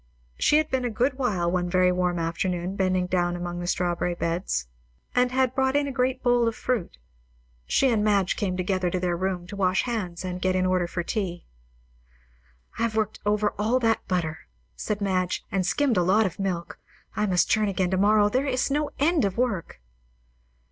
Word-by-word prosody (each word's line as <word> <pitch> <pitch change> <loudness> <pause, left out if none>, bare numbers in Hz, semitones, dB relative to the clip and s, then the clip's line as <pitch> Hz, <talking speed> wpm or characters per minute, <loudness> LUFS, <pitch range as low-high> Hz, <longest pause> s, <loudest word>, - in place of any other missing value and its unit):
She 300 - +4
had 310 0 0
been 260 -1 0
a 245 - 0
good 255 +4 0
while 185 -9 0
one 175 -1 0
very 180 0 +3
warm 180 -1 0
afternoon 175 +2 -2
bending 185 -2 +1
down 175 -1 0
among 175 0 -4
the 175 - -4
strawberry 175 0 0
beds, 165 - -2 0.5
and 250 0 +2
had 260 -1 +1
brought 265 +1 +1
in 290 0 +2
a - - -3
great 260 0 -1
bowl 245 -1 +3
full 235 - +2
of 225 - -1
fruit. 245 - -2 0.7
She 270 - +3
and 220 -3 +2
Madge 200 -3 +2
came 185 -3 -2
together 185 0 0
to 185 - -1
their 175 -1 0
room 185 0 -2
to 185 - -8
wash 190 -1 +1
hands 190 -7 -3
and 180 0 -4
get 185 0 +1
in 185 0 +1
order 185 -1 +1
for 175 0 -3
tea. 180 -3 -3 1.3
"I - - -2
have 230 -1 0
worked 215 -1 -1
over 210 0 +2
all 225 +4 +2
that 225 -3 0
butter," 165 -4 -1 0.4
said 205 - -3
Madge, 185 -2 -1
"and 190 -2 0
skimmed 270 -1 +1
a - - +4
lot 195 +5 +3
of 185 -1 -4
milk. 180 -3 -3 0.4
I 210 - 0
must 180 -2 +2
churn 215 -1 +3
again 190 -2 0
to 190 - +1
morrow. 205 +2 +4
There 255 +7 0
is 255 +1 0
no 295 +1 0
end 315 +2 +2
to 200 - +2
work!" 200 - -2
190 Hz, 205 wpm, -25 LUFS, 180-235 Hz, 1.3 s, She